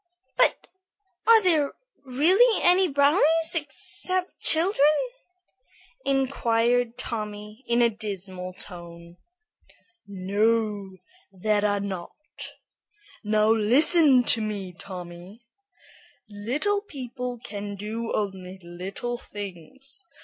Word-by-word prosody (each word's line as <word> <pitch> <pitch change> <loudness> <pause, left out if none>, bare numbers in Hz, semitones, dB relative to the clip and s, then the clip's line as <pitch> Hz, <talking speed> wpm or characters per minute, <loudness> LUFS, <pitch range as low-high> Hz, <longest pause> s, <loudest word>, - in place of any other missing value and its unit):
"But - - +2 0.6
are 450 -1 +7
there 315 -6 +2 0.3
really 355 - +3
any 365 +2 +5
brownies 310 +3 +3
except 360 +4 -2
children?" 325 -2 +3 1.2
inquired 245 -3 +1
Tommy, 210 -1 -6
in 235 0 +3
a 235 - +5
dismal 190 -4 -6
tone. 170 -2 -7 0.9
"No, 200 0 0 0.3
there 205 +2 0
are 205 -1 +1
not. 190 -3 -5 1.1
Now 215 +1 +3
listen 260 +5 +5
to 230 -1 +3
me, 200 -4 -4
Tommy. 180 +5 -10 0.9
Little 280 - 0
people 250 - -6
can 205 -2 -6
do 220 +3 -4
only 190 -2 -3
little 190 +8 -5
things. 205 - -9
225 Hz, 90 wpm, -25 LUFS, 200-275 Hz, 1.2 s, are